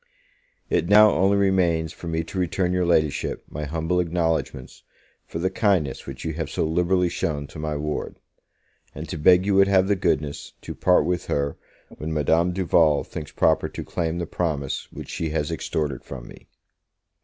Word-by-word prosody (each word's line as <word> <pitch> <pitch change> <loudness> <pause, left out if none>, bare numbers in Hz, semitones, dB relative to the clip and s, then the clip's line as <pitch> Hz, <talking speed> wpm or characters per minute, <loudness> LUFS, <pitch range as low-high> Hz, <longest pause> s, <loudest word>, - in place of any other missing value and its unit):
It 85 - 0
now 105 +1 +8
only 95 +2 +3
remains 85 -5 +1
for 85 - -9
me 80 0 -1
to 95 +4 -6
return 90 0 0
your 90 -1 +1
Ladyship 80 -4 0
my 75 0 -5
humble 80 +4 -1
acknowledgments 80 -6 -2 0.5
for - - -6
the 95 +3 -1
kindness 95 -10 0
which 65 +1 -7
you 80 - -2
have 80 -1 -4
so - - -1
liberally 90 +3 +2
shown 75 -4 -2
to 75 - -11
my 75 -1 -2
ward; 75 +1 -4 0.8
and - - -6
to - - -4
beg 90 +4 +5
you 100 - +1
would 95 0 +5
have 95 -1 +3
the 100 - +2
goodness 75 -5 -2
to - - -7
part 90 -5 +3
with 90 0 -2
her 70 0 -1 0.4
when 80 +1 -4
Madame 80 +3 +2
Duval 85 -5 +3
thinks 75 -3 -8
proper 80 -1 +2
to - - -6
claim 85 0 -2
the 85 - -2
promise 75 -5 -3
which - - -9
she 80 - -3
has 75 0 -2
extorted 75 -3 -3
from 65 -3 -9
me. - - -14
80 Hz, 180 wpm, -24 LUFS, 75-90 Hz, 0.8 s, now